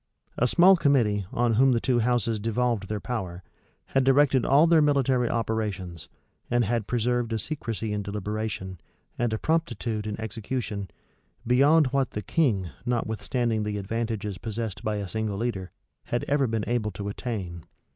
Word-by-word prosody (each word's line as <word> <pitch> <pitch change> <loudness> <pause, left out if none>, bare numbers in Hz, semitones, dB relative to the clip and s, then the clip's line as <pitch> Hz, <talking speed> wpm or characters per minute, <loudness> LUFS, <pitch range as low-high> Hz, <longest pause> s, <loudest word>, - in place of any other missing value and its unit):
A 125 - +2
small 180 +7 +6
committee, 115 - +2
on 120 -1 +1
whom 130 +3 +5
the 115 - +2
two 125 0 +1
houses 115 -2 +1
devolved 115 -1 0
their 105 +1 -3
power, 95 -6 -4 0.5
had 135 - +4
directed 135 -1 +4
all 145 +4 +6
their 165 -1 +5
military 135 -4 +2
operations, 105 -8 -3 0.4
and 120 -1 +2
had 115 0 -1
preserved 120 0 0
a 110 - 0
secrecy 115 -5 -3
in 105 - -1
deliberation, 100 -2 -4 0.4
and 120 -2 +1
a 110 - 0
promptitude 115 -8 -1
in 105 0 -4
execution, 110 -2 -4 0.6
beyond 140 +6 +5
what 135 -2 +2
the 105 - -5
king, 100 - +1
notwithstanding 120 -1 -1
the 105 -1 -2
advantages 105 -1 -3
possessed 110 -3 -4
by 110 0 -1
a 100 -1 -3
single 110 0 -2
leader, 100 -5 -3 0.4
had 120 - -2
ever 140 -2 +2
been 110 -2 -1
able 120 -3 0
to 100 0 -6
attain. 100 -6 -5
115 Hz, 155 wpm, -26 LUFS, 105-125 Hz, 0.6 s, small